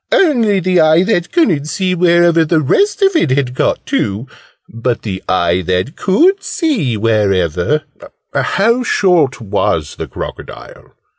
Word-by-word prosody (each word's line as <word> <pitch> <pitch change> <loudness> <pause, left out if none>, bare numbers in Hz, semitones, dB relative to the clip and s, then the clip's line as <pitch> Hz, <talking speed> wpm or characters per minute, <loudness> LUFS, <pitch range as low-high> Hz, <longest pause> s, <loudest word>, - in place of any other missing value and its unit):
"Only 235 - +2
the 185 0 +1
eye 160 +2 +4
that 175 -4 -1
couldn't 175 - +1
see 185 +5 -2
wherever 170 -1 +3
the 160 0 +1
rest 400 - +1
of 390 -2 +2
it 245 - +2
had 130 -1 0
got - - -1
to. 105 +5 -2 0.4
But 115 +1 -3
the 95 -3 -5
eye 85 0 +1
that 90 - -1
could 350 - +2
see 215 - -2
wherever 105 - 0 0.2
" - - -31 0.2
"How 230 +6 +1
short 180 - +1
was 105 -3 -2
the - - -6
crocodile?" - - -10
160 Hz, 145 wpm, -14 LUFS, -, 0.4 s, eye